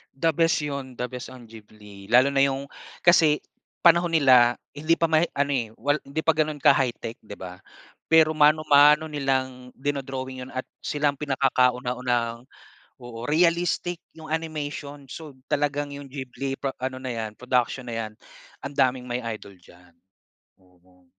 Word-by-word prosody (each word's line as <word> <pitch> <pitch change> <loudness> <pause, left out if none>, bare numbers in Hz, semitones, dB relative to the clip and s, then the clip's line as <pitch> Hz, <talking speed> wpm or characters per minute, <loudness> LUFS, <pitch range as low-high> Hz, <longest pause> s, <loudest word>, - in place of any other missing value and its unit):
The 165 +4 +2
best 165 -1 +3
'yon. 140 -4 -5
The 125 - -1
best 125 0 -8
ang 125 -3 -12
Ghibli 105 -2 -14
lalo 125 +3 +6
na 135 0 +3
'yong 140 0 -1 0.3
kasi 160 -4 +5 0.4
panahon 170 0 +5
nila, 125 -6 +5 0.2
hindi 155 +3 +1
pa 165 - +3
ma-ano, 155 -3 +1
eh. 115 -4 -2
Wal 145 +5 +1
hindi 140 +3 -3
pa 160 -1 +2
gano'n 155 -1 0
ka-high-tech, 120 -3 +2
'di 105 - -10
ba? 90 -1 -8 0.5
Pero 160 -1 +5
mano-mano 150 0 +5
nilang 130 -3 -2
dino-drawing 130 -2 -4
'yon 130 - -11
at 130 0 -5 0.2
sila 150 0 0
ang 140 - -4
pinakakauna-unahang 125 -3 0 0.5
oo, 120 -1 -8
realistic 170 +2 +1 0.2
'yong 155 -1 -8
animation. 145 -3 -4
So 150 -5 -9
talagang 145 -1 -1
'yong 140 -1 -9
Ghibli 135 0 -5
pa 135 -1 -3
ano 130 0 -3
na 130 -1 -5
'yan, 110 -2 -5
production 125 0 -1
na 120 -2 -6
'yan, 110 -1 -5 0.5
ang 140 0 -6
daming 130 -2 +1
may 125 0 -3 0.2
idol 100 -2 -14
diyan. 90 0 -20 0.7
Oo. 90 0 -27
135 Hz, 155 wpm, -25 LUFS, 125-150 Hz, 0.7 s, lalo